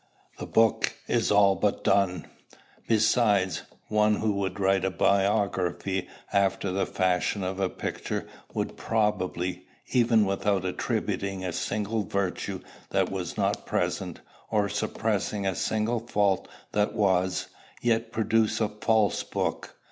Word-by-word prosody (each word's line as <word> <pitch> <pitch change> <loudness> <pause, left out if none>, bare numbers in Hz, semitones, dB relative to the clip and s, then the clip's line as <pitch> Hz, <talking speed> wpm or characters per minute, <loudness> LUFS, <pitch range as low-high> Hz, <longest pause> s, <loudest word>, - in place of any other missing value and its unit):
The - - -5
book 115 -1 +3
is 115 -1 +1
all 100 -1 +5
but 100 +2 0
done. 95 -4 +2 0.6
Besides, 105 -5 +3 0.3
one 105 0 +3
who 110 0 0
would 100 -2 -2
write 95 -1 +2
a 95 - +2
biography 95 -1 +1 0.3
after 100 -1 +2
the 95 +1 0
fashion 95 +1 0
of 95 +1 -3
a 95 -1 +1
picture - - -4 0.3
would - - -3
probably, 95 -4 -1 0.2
even 115 -4 +4
without 100 -1 0
attributing 95 +1 -2
a 90 - -2
single 105 +4 -1
virtue 95 -1 -2 0.3
that - - +1
was - - -4
not - - 0
present, - - -2 0.3
or 105 -2 +2
suppressing 105 -1 -1
a 95 - +1
single 110 +5 0
fault 100 -4 +1 0.2
that 105 0 +1
was, 95 -4 +1 0.3
yet 115 -1 +1
produce 110 0 +1
a 110 -2 +1
false 105 -2 +1
book. - - -3
100 Hz, 130 wpm, -27 LUFS, 95-110 Hz, 0.6 s, all